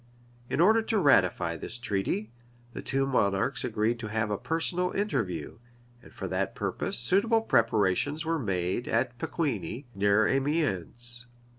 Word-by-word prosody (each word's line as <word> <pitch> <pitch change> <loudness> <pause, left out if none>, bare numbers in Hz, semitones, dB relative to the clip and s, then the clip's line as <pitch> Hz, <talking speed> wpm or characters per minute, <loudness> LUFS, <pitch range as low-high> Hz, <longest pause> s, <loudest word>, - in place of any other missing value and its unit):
[] 120 0 -29
In - - -1
order 220 +6 +5
to 225 0 -1
ratify 90 - +3
this 115 - -5
treaty, 105 -1 -2 0.4
the - - -6
two 135 0 0
monarchs 120 -1 +1
agreed 115 0 0
to 110 - -5
have 110 0 -1
a 105 - 0
personal 175 +2 -1
interview; 115 - -2 0.4
and - - -16
for - - -6
that - - -2
purpose - - -2
suitable 200 - +2
preparations 115 - +1
were 165 0 0
made 95 0 -1
at 120 +2 0
Pecquigni, 130 - -3
near 100 +2 +3
Amiens. 125 - 0
120 Hz, 145 wpm, -28 LUFS, 105-150 Hz, 0.4 s, order